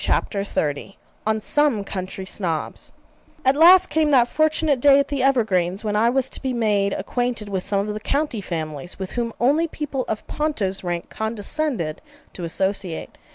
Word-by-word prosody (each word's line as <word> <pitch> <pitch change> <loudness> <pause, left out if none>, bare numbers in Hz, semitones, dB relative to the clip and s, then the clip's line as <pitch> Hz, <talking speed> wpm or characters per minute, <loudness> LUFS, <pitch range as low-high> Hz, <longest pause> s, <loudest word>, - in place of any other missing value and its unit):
CHAPTER 200 - 0
XXX 155 -2 -3 0.3
ON 220 0 +2
SOME 285 -5 +2
COUNTRY 190 -1 -5
SNOBS 170 -5 -3 0.5
At 265 +1 +4
last 360 +4 +7
came 310 -1 +2
that 250 -4 +5
fortunate 310 -1 +1
day 275 +2 +6
at 280 0 +1
the 280 -2 -1
Evergreens, 210 -8 +1
when 210 -1 -1
I 225 +3 +4
was 260 +1 +1
to - - -3
be 265 -1 -2
made 210 -4 +1
acquainted 235 +1 -2
with 190 -2 -1
some 200 +1 0
of 210 - -3
the 210 - -4
'county 275 -1 -1
families' 160 -2 -4
with 190 -1 -5
whom 235 -1 -2
only 290 +7 +3
people 295 -4 -4
of 215 - -4
Ponto's 215 -12 -2
rank 175 -1 -4
condescended 220 - -2 0.3
to 180 - -7
associate. 190 0 -2
220 Hz, 170 wpm, -22 LUFS, 190-275 Hz, 0.5 s, last